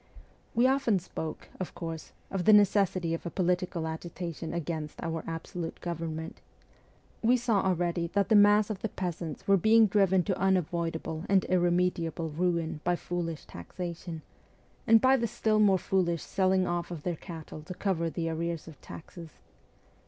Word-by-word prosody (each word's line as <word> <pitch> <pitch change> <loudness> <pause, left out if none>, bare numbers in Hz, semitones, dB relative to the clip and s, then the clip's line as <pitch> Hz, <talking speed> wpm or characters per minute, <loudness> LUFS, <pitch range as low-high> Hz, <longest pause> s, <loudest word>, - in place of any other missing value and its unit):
We 240 +2 +4
often 260 -5 +3
spoke, 160 -3 -6
of 185 - -5
course, 165 -2 -6 0.2
of 190 -2 -2
the 215 - +7
necessity 195 -4 +3
of 165 - -3
a - - -2
political 180 -2 -1
agitation 165 0 -5
against 160 -2 -4
our 165 -1 -3
absolute 165 +1 -5
government. 165 -2 -5 0.8
We 240 +3 +4
saw 230 -5 +1
already 175 -2 0
that 200 -2 +2
the 220 - +5
mass 205 +1 +6
of 200 - -4
the 220 - -2
peasants 170 -5 -5
were 195 0 +6
being 220 +4 +6
driven 190 -3 +3
to 190 -1 -2
unavoidable 170 -3 0
and 195 -1 +4
irremediable 175 -2 +1
ruin 165 -1 -1
by 175 0 +2
foolish 170 -2 -4
taxation, 170 - -7 0.6
and 225 -1 +7
by 260 +3 +5
the 235 -2 0
still 215 -1 +1
more 200 -3 +5
foolish 175 -3 0
selling 190 -1 +2
off 175 0 -2
of 165 -4 -7
their 175 -2 -1
cattle 160 -2 -9
to 180 +4 -8
cover 170 -5 0
the 165 0 -3
arrears 165 0 -3
of 155 -4 -12
taxes. 165 0 -10
175 Hz, 160 wpm, -29 LUFS, 165-195 Hz, 0.8 s, the